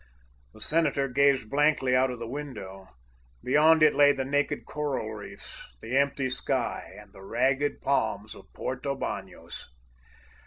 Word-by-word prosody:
The - - -14
senator 150 -3 +1
gazed 135 -3 +2
blankly 145 -3 +3
out 130 +1 +3
of 125 - -5
the 115 0 -6
window. 115 -9 -7 0.6
Beyond 155 +4 +5
it 155 - +6
lay 145 0 +6
the 135 -2 -2
naked 145 +2 0
coral 140 -7 -3
reefs, 100 - -10
the 120 - -4
empty 140 -1 +2
sky, 130 0 -3
and - - -16
the 95 - -13
ragged 130 +7 0
palms - - 0
of - - -15
Porto 135 +2 -3
Banos. 95 - -6
135 Hz, 145 wpm, -28 LUFS, 120-145 Hz, 0.6 s, it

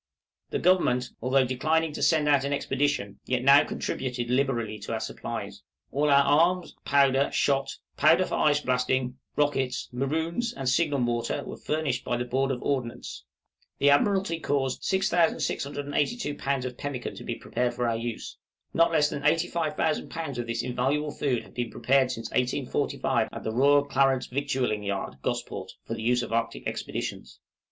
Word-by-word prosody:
The - - -1
Government, 125 -9 +2
although 130 +2 +3
declining 155 +5 0
to - - -6
send 155 -3 +3
out 140 -2 +4
an 140 - -2
expedition, 135 -8 -1
yet 125 -1 0
now 140 +2 +7
contributed 125 -4 -3
liberally 120 -5 0
to 105 +3 -5
our 110 - -1
supplies. 110 - -6 0.3
All 150 +2 +1
our 140 0 +6
arms, 170 +6 +2
powder, 140 -1 +3
shot, 135 -1 +1 0.2
powder 160 +5 +5
for - - -6
ice 145 -1 +3
blasting, 125 0 0 0.2
rockets, 135 -3 0
maroons, 160 - -1
and 135 -1 -5
signal 145 +2 +2
mortar, 120 -2 -1
were - - -6
furnished 150 -5 -2
by 120 - -1
the 125 - -2
Board 135 +2 0
of 130 -2 -3
Ordnance. 130 -4 -3 0.5
The 140 0 +4
Admiralty 190 +2 +2
caused 135 -4 -1
6682 165 - 0
lbs. 140 -2 -2
of 125 -1 -5
pemmican 140 -4 -4
to - - -8
be - - -3
prepared 120 -1 -2
for 120 0 0
our 115 - +1
use. 115 0 -5 0.4
Not 165 0 +4
less 150 -2 +4
than 145 -1 -5
85,000 160 0 0
lbs. 160 -6 -5
of 120 - -3
this 115 0 -2
invaluable 135 +5 0
food 130 -6 -1
have - - -17
been 120 -2 -3
prepared 135 -1 +2
since 115 -2 -5
1845 125 0 0
at - - -7
the 110 - -2
Royal 140 +3 +4
Clarence 135 -2 +2
Victualing 130 -5 -1
Yard, 100 -1 -3
Gosport, - - -4
for - - -4
the - - -5
use 120 +2 +2
of - - -6
the - - +1
Arctic 115 0 -3
Expeditions. - - -5
135 Hz, 170 wpm, -27 LUFS, 125-150 Hz, 0.5 s, now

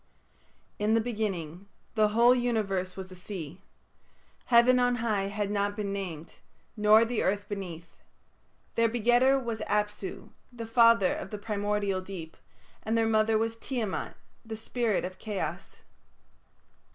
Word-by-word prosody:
In 210 +2 +2
the - - +4
beginning 200 -6 -3 0.3
the 215 -1 +4
whole 235 +4 +5
universe 210 -7 -1
was 190 -1 -7
a - - -9
sea. 180 -3 -8 0.8
Heaven 250 +1 +5
on 245 0 +3
high 220 -4 0
had 205 0 -2
not 205 0 0
been 200 -1 -3
named, 175 -5 -6 0.4
nor 215 +1 +6
the 230 0 -1
earth 205 +1 0
beneath. 175 -5 -7 0.7
Their 230 0 +3
begetter 245 +4 +3
was 235 -4 -4
Apsu, 210 -2 -2 0.2
the 235 -2 -7
father 230 -3 +5
of - - -6
the 210 - -5
primordial 205 -2 -1
Deep, 180 -4 -8 0.5
and 220 +2 -1
their 225 - +3
mother 220 0 +3
was 225 +1 -1
Tiamat, 230 -5 -3 0.3
the 220 -1 -6
spirit 225 -3 -1
of 185 0 -8
Chaos. 185 -5 -5
210 Hz, 140 wpm, -29 LUFS, 195-230 Hz, 0.8 s, nor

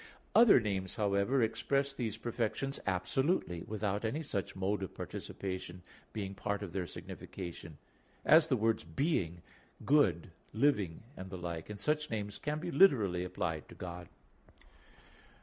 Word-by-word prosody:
Other 230 - +8
names, 95 -4 -2
however, 105 +5 +2
express 135 +5 0
these 115 -5 -3
perfections 120 +4 -2
absolutely, 95 - 0
without 105 -1 -1
any 130 +9 -1
such 100 - -3
mode 95 +2 0
of 95 - -5
participation 95 -2 -5 0.3
being 100 -3 -4
part 100 +1 -2
of 90 -4 -7
their 90 -2 -2
signification 85 -3 -8 0.5
as 160 0 +7
the 135 -5 +2
words 110 0 +1
"being," 85 - -1 0.4
"good," 100 - +3 0.2
"living," 105 - +2
and 95 - -7
the 95 - -6
like, 85 -1 -5
and 105 -1 -6
such 150 +7 0
names 105 -2 -3
can 150 +1 -2
be 175 +2 -4
literally 105 - +5
applied 90 -4 -3
to - - -11
God. 90 -1 -7
100 Hz, 140 wpm, -33 LUFS, 90-135 Hz, 0.5 s, Other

